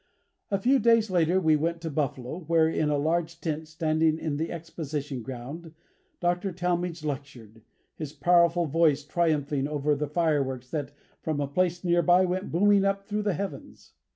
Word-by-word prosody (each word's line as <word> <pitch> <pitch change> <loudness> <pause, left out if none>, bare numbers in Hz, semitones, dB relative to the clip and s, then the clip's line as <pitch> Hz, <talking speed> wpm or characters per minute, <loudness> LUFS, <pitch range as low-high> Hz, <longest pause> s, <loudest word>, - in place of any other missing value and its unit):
A 200 - +1
few 255 +8 +3
days 230 -3 +3
later 175 +1 +3
we 160 -4 +3
went 165 +3 -1
to 165 -1 -4
Buffalo, 140 0 -3
where, 165 -1 +4
in 155 -1 0
a 145 - +1
large 165 +3 -1
tent 160 -1 -3
standing 160 0 +1
in 155 -3 -3
the 160 +2 -2
Exposition 150 -5 -5
ground, 135 +7 -8 0.4
Dr. 175 +2 0
Talmage 175 -1 -2
lectured, 130 -6 -6 0.3
his 150 -3 -6
powerful 170 +3 +3
voice 150 -1 +2
triumphing 150 -4 0
over 150 0 0
the 150 +1 -2
fireworks 140 -5 -1
that, 145 -3 -3 0.3
from 155 -2 -2
a 145 - 0
place 175 +5 0
near 175 -1 +3
by, 175 +3 +5
went 185 +1 -3
booming 200 +3 +4
up 195 0 0
through 210 +1 -2
the 205 -4 0
heavens. 200 +4 -7
160 Hz, 170 wpm, -27 LUFS, 145-175 Hz, 0.4 s, by